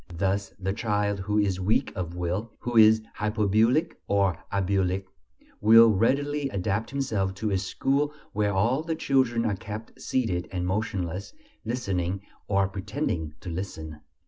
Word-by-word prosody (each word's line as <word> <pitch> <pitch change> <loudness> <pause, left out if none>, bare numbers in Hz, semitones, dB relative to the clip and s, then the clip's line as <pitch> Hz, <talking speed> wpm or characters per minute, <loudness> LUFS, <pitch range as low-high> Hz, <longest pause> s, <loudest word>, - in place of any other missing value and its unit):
Thus 100 +3 0
the 95 0 -2
child 105 -2 0
who 105 +2 -1
is 100 -3 +1
weak 100 +4 +1
of 85 -2 -4
will, 90 +6 -2
who 120 0 -4
is 110 0 +7 0.2
"hypobulic" 110 - +2
or 100 -3 +2 0.2
"abulic," 95 -1 0 0.5
will 115 +1 +8
readily 140 +7 +1
adapt 100 +1 -1
himself 105 -9 -1
to 105 +2 -2
a 95 - +2
school 140 +9 0 0.2
where 105 0 +1
all 120 +9 +2
the 160 0 -2
children 130 -6 +1
are 105 -3 +1
kept 105 +3 -8
seated 95 -9 -1
and 90 -2 -2
motionless, 95 -2 -2 0.3
listening, 100 -6 -2 0.3
or 100 -1 +2
pretending 90 -5 -3
to 95 - -6
listen. 80 -4 -6
100 Hz, 145 wpm, -27 LUFS, 95-115 Hz, 0.5 s, will